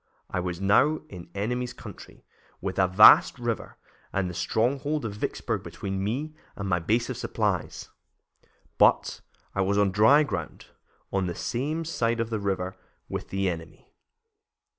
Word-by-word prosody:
I - - -1
was 90 -1 -3
now 125 +11 +3
in 90 -3 -10
the 100 - -7
enemy's 125 +3 -2
country, - - -12 0.3
with 95 0 -4
a 95 - +5
vast 100 +6 +7
river 120 -3 -4 0.3
and 95 -1 0
the 90 - -5
stronghold 135 - 0
of 105 - -3
Vicksburg 105 - -3
between 95 -1 -5
me 135 +9 -2 0.2
and 100 - -5
my 90 -2 +1
base 115 +9 0
of 125 - -5
supplies, 105 -7 -2 0.9
but - - +3 0.3
I 100 - 0
was 100 +1 +1
on 100 -1 +3
dry 110 +10 +6
ground, 85 - -5 0.5
on 95 -2 +1
the 85 - -4
same 150 +7 -2
side 120 -7 0
of 115 0 -2
the 110 - -1
river 95 -2 -2 0.3
with - - -5
the 95 0 -1
enemy." 80 -2 -6
105 Hz, 160 wpm, -27 LUFS, 95-125 Hz, 0.9 s, vast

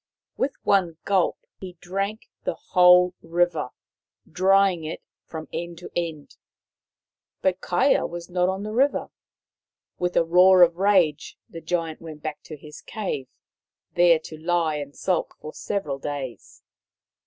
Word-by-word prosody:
With 275 - -1
one 180 -5 +2
gulp 190 -3 +1
he 185 -2 -8
drank 195 +5 -4 0.2
the - - -2
whole 180 0 +5
river, 170 -5 0 0.6
drying 190 0 +3
it 155 +1 -6 0.2
from 160 -1 -7
end 170 +1 -5
to 175 - -10
end. 165 -4 -4 1.1
But 190 -1 +1
Kaia 180 +10 +2
was 170 0 -7
not 180 0 +1
on 190 +1 -3
the 215 - -5
river. 270 +5 +1 0.9
With 180 0 -1
a - - +5
roar 180 +2 +6
of 170 -1 +3
rage 185 -6 +2
the 165 - -10
Giant 165 -1 -3
went 155 -2 -10
back 155 -2 -5
to 155 - -9
his 150 +1 -12
cave, 185 -11 -4 0.7
there 175 -1 +5
to 155 0 -10
lie 165 -2 0
and 145 -1 -7
sulk 185 -3 -1
for 155 - -9
several 150 -10 -3
days. 135 -6 -7
175 Hz, 140 wpm, -24 LUFS, 160-185 Hz, 1.1 s, roar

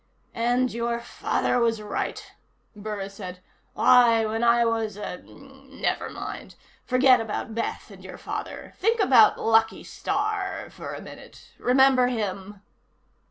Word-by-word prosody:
"And 245 +2 0
your 235 0 -2
father 235 +1 -1
was 230 -2 +1
right," 210 -1 -5 0.4
Burris 205 -2 -6
said. 185 -3 -8 0.4
"Why, 235 -3 +5
when 220 +2 -2
I 235 0 +4
was 225 -3 -1
a 195 -3 -5
never 270 0 -6
mind. - - -8 0.3
Forget 255 0 +5
about 220 0 -5
Beth 230 +1 -4
and - - -14
your - - -9
father. - - -7
Think 455 +3 +1
about 255 - +5
Lucky 225 0 +2
Starr 410 -2 -3
for - - -8
a - - -8
minute. - - -13
Remember 255 0 +4
him?" 205 -4 -4
235 Hz, 130 wpm, -25 LUFS, 215-255 Hz, 0.4 s, Why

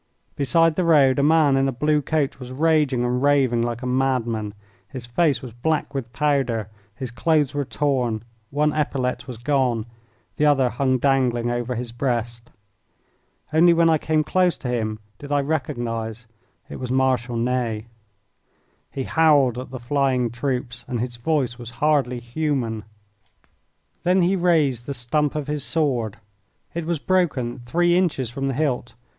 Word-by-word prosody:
Beside 165 +4 +3
the 185 - +2
road 145 -5 +4
a - - +4
man 150 -1 +4
in 135 0 +2
a - - 0
blue 150 +4 +1
coat 145 -1 -1
was 125 -1 -8
raging 145 -3 +2
and 125 +1 0
raving 135 -4 +3
like 120 +1 -3
a - - -3
madman. 120 -5 0 0.3
His 130 -4 -8
face 135 +2 +1
was 125 -4 -8
black 150 +4 -1
with 130 -4 -4
powder, 130 -7 0 0.2
his 130 -1 -6
clothes 150 +3 +1
were 145 -1 -1
torn, 125 -7 -1 0.3
one 150 +1 +1
epaulette 130 -4 -1
was 125 -3 -7
gone, 125 -3 0 0.5
the 150 - +2
other 135 -4 +3
hung 130 +1 +1
dangling 125 -3 +1
over 120 +1 -2
his 120 0 -4
breast. 120 -2 -3 1.0
Only 170 +2 +6
when 165 0 +4
I 160 - +3
came 155 0 +1
close 180 +1 +2
to 125 - -5
him 110 -3 -1 0.2
did 145 0 -9
I 145 0 +3
recognise 120 -6 -3 0.4
that - - -10
it - - -7
was 125 -1 -4
Marshal 130 -2 +1
Ney. 115 -2 -1 1.0
He 135 - -4
howled 145 -6 +3
at 130 - -7
the 130 - -6
flying 130 -2 0
troops 125 -1 -3
and 120 - -2
his 120 0 -3
voice 130 -2 -1
was 120 -1 -7
hardly 140 -5 +1
human. 120 -4 -2 1.2
Then 180 +1 +3
he 185 +3 +2
raised 155 - +1
the 140 - -3
stump 145 +4 0
of 150 -2 -2
his 150 -1 -3
sword 125 -9 -1 0.6
it 170 -1 -3
was 170 -1 0
broken 150 -9 0
three 175 +5 +2
inches 150 -10 0
from 135 +2 -3
the 135 - -1
hilt. 130 -6 -1
130 Hz, 165 wpm, -23 LUFS, 120-150 Hz, 1.2 s, Only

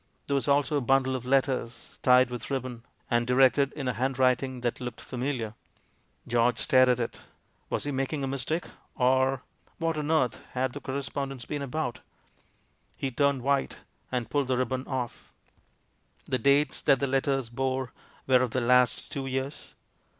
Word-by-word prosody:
There 140 - -2
was 140 0 +2
also 145 +1 +3
a - - 0
bundle 130 +1 +2
of 125 -1 -5
letters, 130 -3 -1
tied 125 0 +5
with 120 -2 -5
rib 135 -2 -1
bon, 125 -2 -7 0.3
and 120 0 +2
directed 135 +2 +4
in 140 -3 -4
a 125 - +1
handwriting 130 +1 +1
that 120 0 -2
looked 125 -2 -5
familiar. 125 -4 -3 0.7
George 120 0 +2
stared 130 0 +4
at 125 -1 +2
it. 115 - -4 0.5
Was - - -1
he 145 - -2
making 135 +2 -2
a - - -1
mistake, 140 +5 -1 0.3
or 130 +1 +2 0.3
What 165 -2 -1
on 150 0 -3
earth 155 -7 +1
had 130 0 -1
the 145 - -7
cor 130 - -4
respondence 135 -2 -4
been 145 -1 -3
about? 135 -2 -3 1.0
He 135 - -2
turned 140 0 +1
white, 140 0 0 0.3
and 125 -3 -1
pulled 145 0 0
the 130 -1 +1
ribbon 130 +1 -1
off. 125 -3 -4 0.9
The 130 - -1
dates 140 0 +3
that 135 - +4
the 140 - +1
letters 135 -2 0
bore 130 +1 -2 0.3
were 130 -1 +5
of 130 - +1
the 130 - -1
last 125 0 +3
two 135 -1 -3
years. 135 +2 -4
130 Hz, 170 wpm, -28 LUFS, 125-140 Hz, 1.0 s, tied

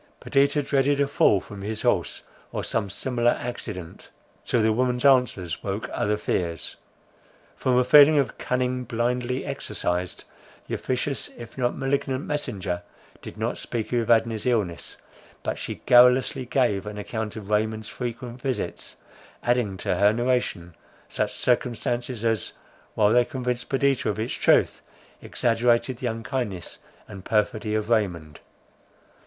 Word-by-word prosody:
Perdita 140 +2 +2
dreaded 140 +1 +2
a 140 - +3
fall 120 -7 +4
from 100 +1 -10
his 110 +2 -4
horse, - - 0 0.3
or - - -3
some 105 -3 -1
similar 120 +4 +1
accident—till 110 0 -5
the 110 0 +3
woman's 125 +2 0
answers 125 -11 +3
woke 100 +2 -3
other 105 +1 0
fears. 85 -5 -2 0.8
From 125 -1 +1
a 125 - +5
feeling 145 +4 +7
of 140 -3 0
cunning 125 0 -1
blindly 125 +2 -1
exercised, 90 +1 -3 0.4
the - - -6
officious, 130 +2 -2
if 115 -1 -10
not 125 -2 -1
malignant 135 0 -1
messenger, 100 -12 -3 0.4
did - - -9
not - - -2
speak 115 0 -4
of 120 - +3
Evadne's 115 -1 +2
illness; 100 -10 -1 0.5
but - - -2
she - - -6
garrulously 125 +1 +5
gave 120 -7 +1
an 105 0 -6
account 110 +1 -4
of 105 -2 -8
Raymond's 110 +1 0
frequent 120 +1 -6
visits, 130 -1 -3 0.5
adding 120 -6 +1
to 90 - -1
her 100 +2 +5
narration 120 -8 -1 0.4
such - - -2
circumstances, 120 -1 -1
as, 115 -3 0 0.4
while 105 0 +4
they 120 0 +6
convinced 125 -1 -3
Perdita 135 -3 +1
of 105 - -2
its 110 +3 -2
truth, - - +3 0.4
exaggerated 120 +1 +1
the 125 - -3
unkindness 110 -4 -4 0.3
and 95 -2 -10
perfidy 105 0 0
of 110 +1 -2
Raymond. 85 -9 0
120 Hz, 135 wpm, -25 LUFS, 105-125 Hz, 0.8 s, feeling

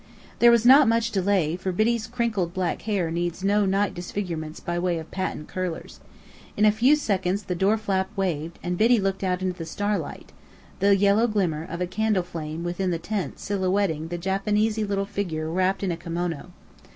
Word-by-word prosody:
There 240 - +7
was 235 -1 +4
not 270 +2 +8
much 230 0 +2
delay, 190 -5 +1
for 185 +1 -3
Biddy's 220 +4 +1
crinkled 225 -7 -1
black 185 -2 -1
hair 185 -6 0
needs 175 +2 -2
no 200 0 +3
night 195 +1 +1
disfigurements 175 -3 -5
by 175 -1 -3
way 175 -1 0
of 160 0 -8
patent 185 -5 -3
curlers. 185 -3 -5 0.6
In 210 - +4
a 210 - +7
few 245 +8 +4
seconds 195 -7 -1
the 185 - -3
door 195 +5 +2
flap 195 -3 -1
waved, 170 -4 -2
and 175 0 -2
Biddy 230 +2 +5
looked 195 0 -1
out 185 0 -1
into 185 -1 -1
the - - -3
starlight, 205 0 -3 0.5
the 200 +1 +5
yellow 200 +4 +4
glimmer 180 -8 0
of 170 +2 -5
a - - +2
candle 195 +1 0
flame 160 -1 -6
within 175 +2 -2
the 170 - 0
tent 195 +3 -4
silhouetting 190 -5 -1
the 175 +1 -4
Japanesey 210 +4 0
little 200 -1 -1
figure 175 -6 -3
wrapped 185 +3 0
in 190 - 0
a 165 - -3
kimono. 170 -1 -4
190 Hz, 190 wpm, -25 LUFS, 175-205 Hz, 0.6 s, not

